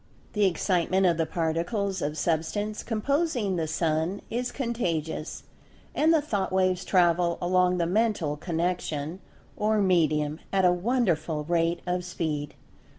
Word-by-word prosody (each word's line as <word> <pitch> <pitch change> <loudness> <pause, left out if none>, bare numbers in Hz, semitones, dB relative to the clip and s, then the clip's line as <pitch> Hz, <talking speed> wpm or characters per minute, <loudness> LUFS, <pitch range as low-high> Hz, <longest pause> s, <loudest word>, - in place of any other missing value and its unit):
The 210 -1 +3
Excitement 185 +1 +1
of 170 -3 +3
the 165 -1 0
Particles 175 +4 -1
of 150 +1 -2
Substance 175 +7 -1
composing 245 - 0
the 165 -2 -1
Sun 160 +4 -1
is 245 +2 -2
"contagious," 170 - -3 0.5
and 315 +2 +3
the 320 -3 +3
Thought 200 -10 -1
waves 185 -1 +1
travel 175 -2 +3
along 180 0 +2
the 170 - +1
Mental 190 -5 +1
Connection, 165 -1 -2 0.4
or 215 +1 +1
medium, 155 -5 +2
at 190 -1 +3
a 180 - +5
wonderful 180 -7 0
rate 170 +1 0
of 180 0 -1
speed. 155 -4 -3
180 Hz, 135 wpm, -27 LUFS, 165-205 Hz, 0.5 s, a